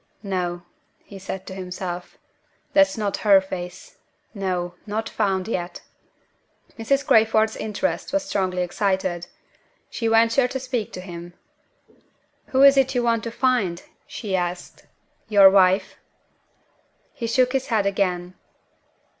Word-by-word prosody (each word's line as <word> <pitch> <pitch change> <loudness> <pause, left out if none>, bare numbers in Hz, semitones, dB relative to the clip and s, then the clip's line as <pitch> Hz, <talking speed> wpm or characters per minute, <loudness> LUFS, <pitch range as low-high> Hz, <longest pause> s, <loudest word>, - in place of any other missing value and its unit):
"No!" 180 -3 -3 0.4
he 195 - -11
said 190 0 -6
to 190 - -8
himself, 180 -1 -6 0.6
"that's 290 -3 +4
not 205 -2 -1
her 200 -2 +5
face. 180 -2 -8 0.4
No! 180 -4 -3
not 220 +2 -2
found 190 -3 -1
yet." 175 -5 -4 0.9
Mrs. 275 +4 0
Crayford's 220 -1 +3
interest 220 +7 -3
was 290 0 0
strongly 185 -8 -1
excited. 185 -2 -1 0.6
She 230 - -2
ventured 230 +3 +3
to 265 - -3
speak 255 -4 -3
to 180 - -6
him. 175 -1 -9 1.1
"Who 265 +1 +3
is 275 0 +8
it 270 0 +2
you 245 - +1
want 230 -1 +1
to 230 - -4
find?" 235 -8 0 0.2
she 205 -5 -4
asked. 175 -1 -4 0.4
"Your 200 -2 +8
wife?" 190 0 +3 1.2
He 230 - -4
shook 255 +2 +2
his 265 0 -1
head 215 -4 +1
again. 180 -3 -1
200 Hz, 130 wpm, -23 LUFS, 185-230 Hz, 1.2 s, is